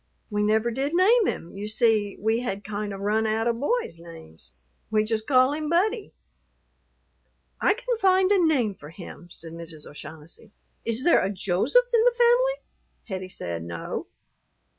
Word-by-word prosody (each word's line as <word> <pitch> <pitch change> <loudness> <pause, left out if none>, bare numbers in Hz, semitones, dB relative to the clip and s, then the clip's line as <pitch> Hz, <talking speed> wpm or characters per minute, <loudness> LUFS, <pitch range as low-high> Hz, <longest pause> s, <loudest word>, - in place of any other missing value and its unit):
"We 210 0 0
never 220 +3 +2
did 275 +6 -2
name 420 +5 +5
him; 170 - -4
you 205 +1 -5
see 215 -2 +1
we 220 +2 +1
had 200 -5 -4
kind 210 0 -4
of 195 0 -7
run 215 +2 +1
out 220 +1 0
of 235 -1 0
boys' 290 - -1
names. 165 - -13 0.4
We 215 -1 +2
just 220 0 -2
called 260 +1 +4
him 305 -1 -3
Buddy." 410 +6 +1 1.5
"I - - +4
can - - -3
find 380 -1 +4
a 390 -3 +4
name 260 -10 +2
for 150 -5 -12
him," 175 0 -11
said 165 -1 -9
Mrs. 165 -2 -7
O'Shaughnessy. 155 +8 -11 0.3
"Is 230 +2 -1
there 345 - +5
a 190 - 0
Joseph 200 - +2
in 455 -1 +5
the - - +3
family?" 485 +1 +5 0.6
Hettie 185 -1 -4
said 85 - -5
no. 85 0 -5
220 Hz, 165 wpm, -25 LUFS, -, 1.5 s, name